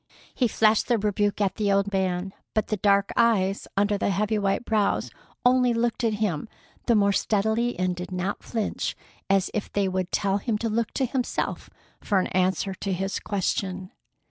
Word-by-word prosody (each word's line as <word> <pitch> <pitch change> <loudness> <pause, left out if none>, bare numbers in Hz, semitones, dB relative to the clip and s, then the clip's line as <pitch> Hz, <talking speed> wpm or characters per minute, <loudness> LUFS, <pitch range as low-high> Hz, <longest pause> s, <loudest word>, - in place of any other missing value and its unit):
He 250 - +2
flashed 215 0 +3
the 240 - +3
rebuke 205 0 0
at 195 -2 0
the 205 -2 +1
old 200 +1 +1
man, 190 0 -1 0.2
but 215 - 0
the 215 - 0
dark 200 0 +3
eyes 205 -5 +2
under 205 0 +2
the - - +1
heavy 210 +3 0
white 195 +4 0
brows 215 -2 +1 0.3
only 250 -1 +4
looked 235 +1 0
at 225 -2 +2
him 205 -2 -2 0.4
the 235 - +4
more 200 -1 +4
steadily 220 +4 +1
and 185 0 0
did 180 +1 -7
not 185 +2 -2
flinch, 225 -3 -2 0.3
as 195 -1 +2
if 210 - -3
they 200 -1 +1
would 185 -1 -2
tell 200 0 +1
him 215 +1 -1
to 230 +1 -2
look 225 +1 -1
to 270 - +1
himself 250 0 -2 0.3
for 205 - +1
an 185 - 0
answer 185 +1 +1
to 195 +1 -4
his 195 +2 -2
question. 190 -1 -2
205 Hz, 185 wpm, -25 LUFS, 190-220 Hz, 0.4 s, only